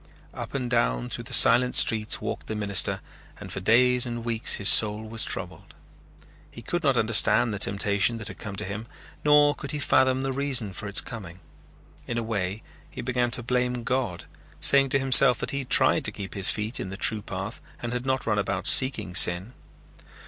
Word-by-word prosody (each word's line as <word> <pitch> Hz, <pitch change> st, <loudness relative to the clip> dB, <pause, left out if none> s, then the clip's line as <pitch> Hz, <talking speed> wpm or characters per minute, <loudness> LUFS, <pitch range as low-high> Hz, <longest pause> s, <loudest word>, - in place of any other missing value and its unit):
Up -, -, -8 dB
and 130 Hz, -2 st, -3 dB
down -, -, -1 dB
through -, -, -6 dB
the -, -, -9 dB
silent 125 Hz, +2 st, +4 dB
streets 110 Hz, -2 st, +2 dB
walked -, -, -6 dB
the 110 Hz, -, -5 dB
minister 100 Hz, -2 st, 0 dB, 0.4 s
and -, -, -10 dB
for -, -, -4 dB
days 125 Hz, +4 st, +3 dB
and 120 Hz, -1 st, -5 dB
weeks 115 Hz, -1 st, +1 dB
his 100 Hz, -, -2 dB
soul 105 Hz, 0 st, +5 dB
was 115 Hz, 0 st, +1 dB
troubled. -, -, -8 dB, 0.7 s
He -, -, -13 dB
could -, -, -3 dB
not -, -, +1 dB
understand 115 Hz, -, +2 dB
the 100 Hz, -, -5 dB
temptation 100 Hz, +3 st, 0 dB
that 110 Hz, -3 st, -8 dB
had -, -, -11 dB
come 100 Hz, -2 st, -8 dB
to 105 Hz, -, -2 dB
him 105 Hz, +4 st, -7 dB, 0.4 s
nor 150 Hz, 0 st, +4 dB
could 140 Hz, -, -10 dB
he 150 Hz, -, -4 dB
fathom 130 Hz, -2 st, +1 dB
the 135 Hz, 0 st, -3 dB
reason 130 Hz, -7 st, 0 dB
for 100 Hz, -, -7 dB
its 100 Hz, -, +2 dB
coming. 95 Hz, -7 st, -10 dB, 0.7 s
In 115 Hz, -, -4 dB
a 115 Hz, -, -2 dB
way 100 Hz, -2 st, -4 dB, 0.3 s
he -, -, -8 dB
began 125 Hz, 0 st, -1 dB
to 120 Hz, 0 st, +1 dB
blame 125 Hz, 0 st, -2 dB
God, 120 Hz, -9 st, -3 dB, 0.3 s
saying 140 Hz, -1 st, +3 dB
to 135 Hz, -, +2 dB
himself 135 Hz, -2 st, +6 dB
that -, -, -5 dB
he 140 Hz, -, -4 dB
had 135 Hz, -, -8 dB
tried -, -, +3 dB
to -, -, +2 dB
keep 100 Hz, -1 st, -9 dB
his 95 Hz, -2 st, +2 dB
feet 110 Hz, +3 st, -4 dB
in 95 Hz, -, -6 dB
the 95 Hz, -, -8 dB
true 110 Hz, 0 st, 0 dB
path 95 Hz, +3 st, -7 dB, 0.2 s
and 120 Hz, 0 st, -6 dB
had 125 Hz, 0 st, -4 dB
not 130 Hz, 0 st, -2 dB
run 105 Hz, -2 st, -1 dB
about 100 Hz, -2 st, -3 dB
seeking 130 Hz, -9 st, +2 dB
sin. 90 Hz, +6 st, +2 dB
115 Hz, 205 wpm, -25 LUFS, 100-125 Hz, 0.7 s, himself